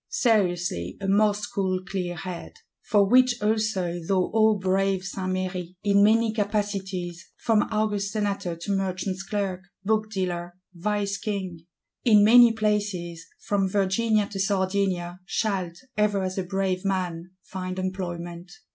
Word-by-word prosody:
Seriously, 175 - +1
a 195 - -4
most 205 +1 +3
cool 185 -2 0
clear 180 -2 -3
head;—for 190 +3 -2
which 250 +2 +4
also 210 -5 0
thou 185 +2 0
O 220 -1 +4
brave 190 0 +1
Saint 190 -1 -3
Méry, 185 -1 -3
in 200 0 +4
many 220 +1 +4
capacities, 195 -5 -2
from 220 -3 +2
august 210 -2 0
Senator 200 -5 -2
to 170 +5 -5
Merchant's 190 0 -2
Clerk, 195 -2 -2 0.2
Book 215 +1 +1
dealer, 175 -3 -3 0.2
Vice 200 +2 -1
King; 185 -6 -4 0.4
in 215 -4 +6
many 240 +2 +8
places, 205 -6 -2
from 195 -2 0
Virginia 210 +2 +2
to 195 - -6
Sardinia, 190 -2 0
shalt, 190 -3 -1 0.2
ever 205 -2 +1
as 185 +1 -2
a - - -1
brave 190 0 -1
man, 180 -2 -2
find 185 -1 -5
employment. 175 -2 -5
195 Hz, 130 wpm, -25 LUFS, 185-210 Hz, 0.4 s, many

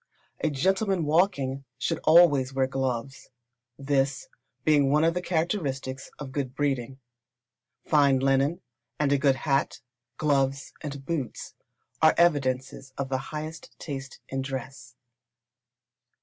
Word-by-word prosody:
A 155 - +3
gentleman 190 +5 +1
walking, 145 -5 +1
should - - -1
always 145 -5 +5
wear 135 0 +3
gloves, 135 0 -3 0.5
this 135 0 0 0.4
being 145 -3 +4
one 150 +2 +3
of 165 +1 +3
the 180 - -2
characteristics 155 -7 -2
of 140 -3 -7
good 130 -2 -3
breeding. 135 -3 -1 0.9
Fine 140 -3 +4
linen, 135 +4 +2 0.4
and 145 -2 +2
a 140 - +3
good 140 -1 +3
hat, 135 0 0 0.4
gloves, 140 -2 0
and 140 -2 -6
boots, 140 -7 -4 0.5
are 160 0 +6
evidences 135 -5 +1
of 140 -1 -3
the 130 -1 0
highest 155 +1 -7
taste 135 -3 -7
in 135 0 -3
dress. 135 0 -7
140 Hz, 120 wpm, -27 LUFS, 135-155 Hz, 0.9 s, are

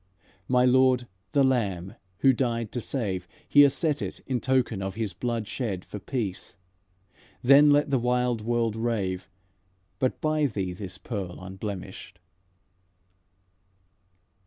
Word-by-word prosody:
My 125 0 +4
Lord, 130 -1 +4 0.2
the 140 -2 +4
Lamb 100 -9 0 0.3
Who 135 -1 +6
died 115 -3 -1
to 120 - -3
save, 95 -9 -3 0.2
Here 145 -1 +7
set 150 +1 -1
it - - -5
in 130 -2 -1
token 125 -6 +1
of 95 0 -4
His 110 -5 -3
blood 115 +1 -3
shed 100 -4 -3
For 105 - -7
peace. 100 -5 -4 0.9
Then 140 +3 +7
let 145 0 +3
the 135 - +3
wild 125 -1 +1
world 115 -1 0
rave, 100 -6 -2 0.7
But 130 - 0
buy 155 -1 +1
thee 95 -7 -3
this 95 0 -8
pearl 100 -7 -5
unblemishèd." 95 0 -7
115 Hz, 130 wpm, -27 LUFS, 95-130 Hz, 0.9 s, Here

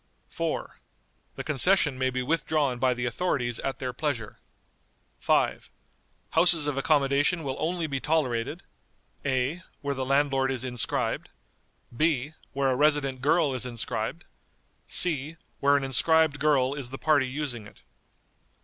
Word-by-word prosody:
"4. - - -4 0.6
The - - -5
concession 155 +1 +3
may 130 0 0
be 130 0 -2
withdrawn 145 -3 0
by 130 0 +2
the 120 0 -3
authorities 120 -3 -1
at 135 - -3
their 125 -1 -4
pleasure." 125 -6 -3 0.8
"5. - - +1 0.6
Houses 170 -4 +5
of 145 -2 -1
accommodation 145 +3 +2
will 135 -2 -3
only 170 +1 -1
be 140 -3 -2
tolerated, 145 -1 -1 0.6
(a.) 135 +5 -1 0.2
where 140 0 -2
the 135 -1 -3
landlord 135 0 +2
is 130 -2 -2
inscribed; 125 -3 -1 0.7
(b.) 150 0 +1 0.2
where 135 -1 0
a - - +1
resident 145 -2 +1
girl 150 0 +2
is 130 - -3
inscribed; 120 +4 -4 0.6
(c.) 155 -2 0 0.2
where 140 0 +4
an 140 - -2
inscribed 155 +3 +3
girl 140 -3 +2
is 140 -4 -6
the 135 - -7
party 145 -4 +2
using 130 -5 -4
it." - - -18
140 Hz, 140 wpm, -27 LUFS, 130-155 Hz, 0.8 s, Houses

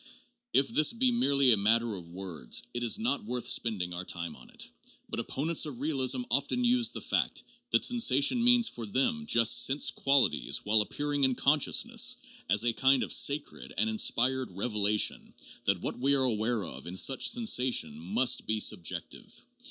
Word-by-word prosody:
If 135 0 +2
this 155 +8 +3
be 250 +2 +1
merely 140 - +2
a - - +2
matter 115 +3 +2
of 90 -4 -9
words, 85 -8 -4
it 120 - -4
is 120 - +3
not 230 +1 -2
worth 125 - -5
spending 95 -6 -1
our 90 +1 -5
time 85 -3 -6
on - - -16
it. - - -8 0.4
But - - -6
opponents 155 +3 -2
of 130 -5 -9
realism 135 -3 -1
often 195 - 0
use 240 -1 +3
the - - -8
fact - - -1 0.3
that - - +2
sensation 235 - +2
means 245 -1 +4
for 115 - -7
them 225 - -1
just 115 - +4
'sense 135 +2 +1
qualities 140 -1 0
while 105 +1 +3
appearing 145 +6 -3
in 130 -1 +2
consciousness' 230 - +1 0.3
as 105 +2 +3
a 120 -1 0
kind 135 +2 +2
of - - -1
sacred 145 +1 -1
and 110 +2 0
inspired 125 +4 +1
revelation 105 +1 -1 0.3
that - - 0
what - - -5
we 140 +2 +2
are 135 - +1
aware 110 -2 -1
of - - -9
in 90 +2 -5
such 135 +7 +2
sensation 125 - +1
must 105 +10 0
be 110 0 -1
subjective. 95 -5 -3
130 Hz, 175 wpm, -29 LUFS, 105-150 Hz, 0.4 s, means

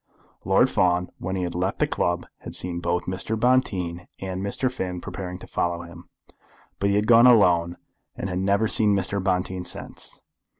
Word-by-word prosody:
Lord - - +4
Fawn, 90 0 +1
when 95 +2 -3
he 95 - -1
had 85 - -3
left 90 +3 -1
the - - +2
club, 85 0 -1
had - - -7
seen 90 -1 -2
both 85 0 -1
Mr. 95 +4 -3
Bonteen 95 -9 +1
and 95 -1 -5
Mr. 125 +6 -1
Finn 90 -8 -4
preparing 90 0 -6
to - - -11
follow 85 -1 -2
him, 85 0 -13 0.7
but 100 - +1
he 100 - +2
had 105 +1 +2
gone 115 +2 +7
alone, 90 -7 +4 0.4
and - - -4
had 90 -1 -2
never 100 +3 +2
seen 105 -1 +3
Mr. 95 0 -1
Bonteen 90 -1 -1
since. - - -6
95 Hz, 180 wpm, -24 LUFS, 90-100 Hz, 0.7 s, gone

